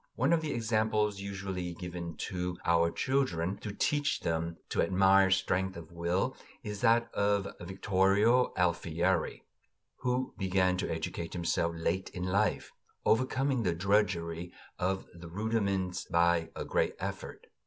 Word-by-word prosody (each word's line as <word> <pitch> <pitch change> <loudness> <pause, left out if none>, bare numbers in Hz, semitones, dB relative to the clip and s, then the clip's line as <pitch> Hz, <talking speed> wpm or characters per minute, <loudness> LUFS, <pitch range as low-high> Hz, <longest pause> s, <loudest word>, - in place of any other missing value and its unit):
One 130 +7 +2
of 165 - +3
the 155 -2 -3
examples 110 -3 +1
usually 95 -3 -4
given 85 -1 -6 0.2
to 90 -1 -3
our 85 0 +4
children, 100 -7 0
to 105 - -6
teach 145 +7 0
them 85 0 -2
to - - +1
admire 95 +1 +5
strength 95 -1 +1
of 85 -1 -10
will, 85 +9 -1 0.3
is 105 -3 -5
that 115 +1 +3
of 100 -1 +1
Vittorio 95 +6 +3
Alfieri, 85 -1 0 0.5
who 125 +1 -1
began 95 -1 +2
to 90 - -2
educate 80 +1 -4
himself 85 -1 0
late 85 +3 -1
in 90 - -3
life, 100 +3 0 0.3
overcoming 130 +2 +2
the 90 -6 0
drudgery 90 -3 0 0.3
of 95 +1 -1
the 85 0 -10
rudiments 100 -2 -1
by 85 -1 +2
a - - -4
great - - 0
effort. - - -6
95 Hz, 135 wpm, -31 LUFS, 85-105 Hz, 0.5 s, admire